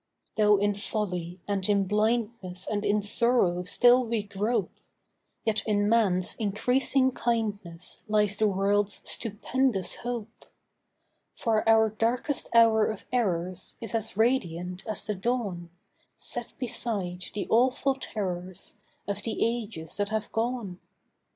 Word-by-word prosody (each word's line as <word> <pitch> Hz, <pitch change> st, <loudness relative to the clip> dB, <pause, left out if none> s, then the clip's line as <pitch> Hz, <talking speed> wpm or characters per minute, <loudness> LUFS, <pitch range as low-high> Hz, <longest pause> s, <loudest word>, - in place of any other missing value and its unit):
Though 210 Hz, -1 st, +5 dB
in 205 Hz, +1 st, +1 dB
folly 185 Hz, -4 st, -3 dB
and 200 Hz, -1 st, 0 dB
in 200 Hz, -1 st, +3 dB
blindness 210 Hz, -2 st, -1 dB
And 205 Hz, -1 st, -2 dB
in 210 Hz, 0 st, +1 dB
sorrow 205 Hz, -5 st, +2 dB
still 245 Hz, +6 st, +5 dB
we 230 Hz, -3 st, -1 dB
grope, 205 Hz, +4 st, -1 dB, 0.7 s
Yet 215 Hz, -1 st, +1 dB
in 205 Hz, -1 st, +2 dB
man's 200 Hz, -5 st, +3 dB
increasing 255 Hz, +5 st, +2 dB
kindness 205 Hz, -8 st, -3 dB
Lies 210 Hz, -1 st, +2 dB
the 215 Hz, +1 st, +2 dB
world's 200 Hz, +1 st, +1 dB
stupendous 225 Hz, -2 st, 0 dB
hope; 235 Hz, -2 st, -6 dB, 0.9 s
For 225 Hz, -2 st, +1 dB
our 220 Hz, -1 st, +5 dB
darkest 240 Hz, +6 st, -1 dB
hour 225 Hz, -2 st, +5 dB
of 215 Hz, -, -5 dB
errors 185 Hz, -6 st, -1 dB
Is 225 Hz, -4 st, -6 dB
as 220 Hz, -2 st, -3 dB
radiant 180 Hz, -6 st, 0 dB
as 215 Hz, -2 st, -1 dB
the 210 Hz, -, -1 dB
dawn, 195 Hz, -5 st, -2 dB, 0.5 s
Set -, -, -2 dB
beside 200 Hz, -8 st, -2 dB
the 205 Hz, -, -2 dB
awful 260 Hz, +4 st, +3 dB
terrors 185 Hz, -7 st, -5 dB, 0.3 s
Of 200 Hz, -, -2 dB
the 225 Hz, -, -4 dB
ages 225 Hz, -8 st, -3 dB
that 205 Hz, -1 st, -1 dB
have 220 Hz, -1 st, -3 dB
gone. 225 Hz, -5 st, -2 dB
210 Hz, 125 wpm, -27 LUFS, 195-230 Hz, 0.9 s, Though